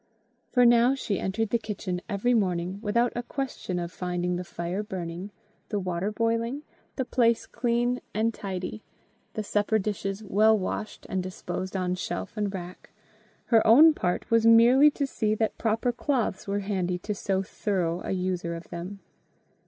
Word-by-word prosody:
For 250 -1 +4
now 240 +2 +5
she 210 -7 -2
entered 205 +3 -1
the 235 - +2
kitchen 200 -5 -4
every 225 +4 +1
morning 185 -3 0
without 235 +3 +1
a 240 - -1
question 250 -8 -4
of 170 0 -3
finding 180 0 -2
the 180 - -3
fire 175 +2 -4
burning, 185 -2 -5 0.4
the 210 - -1
water 185 +2 -2
boiling, 230 +5 -1 0.3
the 260 - -1
place 235 -2 +2
clean 240 +1 0
and 225 +2 0
tidy, 195 +1 -5 0.5
the 215 - -2
supper 210 +1 +1
dishes 200 0 -3
well 215 +2 +4
washed 210 +2 -4
and 190 -1 -1
disposed 185 +1 -5
on 180 -1 0
shelf 185 +4 -4
and 210 -2 -1
rack: 180 -1 -8 0.6
her 225 - +7
own 305 +8 +8
part 180 -6 -2
was 230 -1 +4
merely 235 +6 +7
to 285 -1 -2
see 215 -5 0
that 220 0 -1
proper 225 +2 +1
cloths 240 -7 -1
were 200 +1 -1
handy 185 -3 -1
to 210 +4 -4
so 195 -1 -1
thorough 180 -3 -1
a - - -5
user 180 -2 -1
of 165 - -9
them. 180 +4 -7
205 Hz, 165 wpm, -27 LUFS, 185-230 Hz, 0.6 s, own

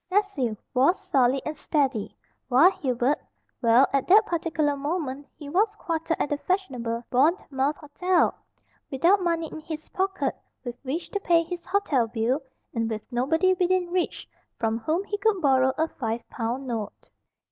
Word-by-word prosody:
Cecil 365 - 0 0.2
was 275 +9 +3
solid 260 0 +2
and 310 - -3
steady, 275 -8 -1 0.3
while 275 +9 +6
Hubert 260 -3 0 0.4
well, 235 +3 +6
at 275 -1 +1
that 425 +4 +7
particular 320 -5 0
moment 285 -1 -3
he 295 - -9
was 380 +9 +1
quartered 330 -1 -2
at - - 0
that 290 0 -3
fashionable 250 -12 -1
Bournemouth 280 0 +2
hotel, 345 +4 +1 0.6
without 345 +8 +3
money 335 -2 0
in - - -7
his 315 0 -7
pocket 385 +1 -1 0.3
with 245 -2 -4
which 285 +6 -4
to 405 - -1
pay 340 -3 +3
his 345 +1 -7
hotel 345 - +1
bill, 230 +5 0 0.3
and 230 -1 -1
with 215 -1 -4
nobody 320 +10 +2
within 365 -1 +1
reach 360 -1 -1 0.3
from 225 0 0
whom 315 - 0
he 410 0 -4
could 425 -2 +2
borrow 265 -4 +4
a 320 +1 +2
five 230 -5 -4
pound 240 +3 -3
note. 225 -5 -5
295 Hz, 160 wpm, -26 LUFS, 255-355 Hz, 0.6 s, that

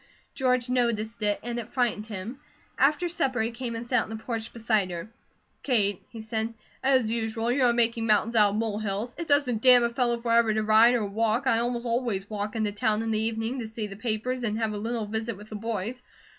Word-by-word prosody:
George 255 -2 +1
noticed 235 -3 0
it, 205 -1 +1
and 240 0 -3
it 235 0 -7
frightened 240 -5 0
him. 220 +5 -6 0.4
After 300 +6 +3
supper 275 -7 -1
he 225 +2 -1
came 235 0 -5
and 230 +1 -5
sat 250 +1 +2
on - - -6
the 220 - -5
porch 225 0 -4
beside 220 -4 0
her. 175 +5 -6 0.5
"Kate," 205 -7 +1
he 225 - -9
said, 220 +1 -3 0.3
"as 260 -4 +3
usual 225 0 -1
you 260 +1 +2
are 240 - +5
'making 230 -1 +1
mountains 220 +2 +2
out 210 -2 +6
of - - -2
mole 215 -1 -1
hills.' 215 +3 -3
It 335 - -4
doesn't 270 -6 +2
damn 250 -1 +7
a 235 - +2
fellow 240 0 0
forever 230 -2 +2
to 215 - +1
ride 220 +3 +6
or 225 -3 0
walk, 220 +5 0
I 230 -3 +3
almost 240 0 -2
always 230 -5 -1
walk, 210 +1 -4
into 215 -2 0
town 210 +1 0
in 225 - -2
the 215 0 +1
evening, 225 +3 -2
to 230 - -4
see 220 0 -5
the 200 -1 -8
papers 235 +3 -2
and 215 -2 -1
have 220 -2 -1
a - - -4
little 225 +1 -2
visit 220 0 -3
with 210 +1 -13
the 215 - -7
boys. 225 +2 -4
225 Hz, 225 wpm, -27 LUFS, 215-240 Hz, 0.5 s, damn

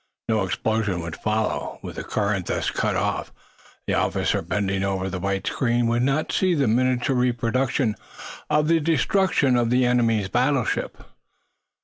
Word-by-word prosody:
No 110 -2 +1
explosion 105 -1 -1
would 85 -1 -6
follow. 110 0 -2
With - - -7
the - - -4
current 100 -4 -1
thus - - -1
cut - - -1
off, - - -1 0.5
the - - -1
officer - - 0
bending 100 -2 -1
over 95 -1 -1
the 90 - -3
white 100 +1 -2
screen 120 -1 +1
would 120 +1 +1
not 135 +4 0
see 185 -2 +2
the 140 -5 +1
miniature 125 +3 +1
reproduction 125 0 +1 0.6
of 150 0 +2
the 165 0 +4
destruction 160 -2 +2
of 120 -1 +2
the 125 +1 +3
enemy's 115 -5 +2
battleship. 125 +4 0
120 Hz, 150 wpm, -23 LUFS, 105-130 Hz, 0.6 s, the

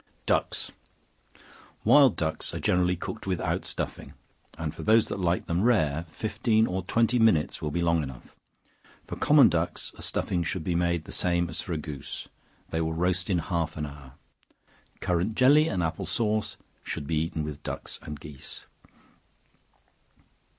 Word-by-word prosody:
Ducks. - - 0 1.1
Wild 140 -6 +6
ducks 80 -1 0
are - - -3
generally 90 0 +2
cooked - - -6
without - - -1
stuffing, - - -4 0.4
and 80 -2 -3
for - - -8
those 110 0 +4
that 100 - -3
like 90 -1 +1
them 85 +2 0
rare, 85 -9 +2
fifteen 110 +2 +1
or 95 -1 -2
twenty 115 +5 +2
minutes 110 -10 +3
will 75 - -1
be 85 +3 -1
long 85 -1 +3
enough; 65 -4 -9 0.7
for - - -6
common 145 -4 +6
ducks, 85 -1 -1
a - - -8
stuffing 90 - -1
should 85 +1 -2
be 90 - -1
made 85 -1 +1
the - - -9
same 85 -1 +1
as - - -2
for 90 - -4
a - - -1
goose; 75 -3 -6 0.4
they 80 - 0
will 80 0 -1
roast 90 +2 0
in 95 - +2
half 85 -2 -2
an 75 - -2
hour. 70 -2 -11 0.9
Currant 90 +4 0
jelly 145 +4 +6
and 90 - -1
apple 80 - -2
sauce 110 -1 -1 0.3
should - - -4
be 80 +2 -1
eaten 80 -1 -2
with 75 -2 -6
ducks - - -6
and 75 -1 -7
geese. 75 -3 -9
85 Hz, 165 wpm, -27 LUFS, 80-105 Hz, 1.1 s, Wild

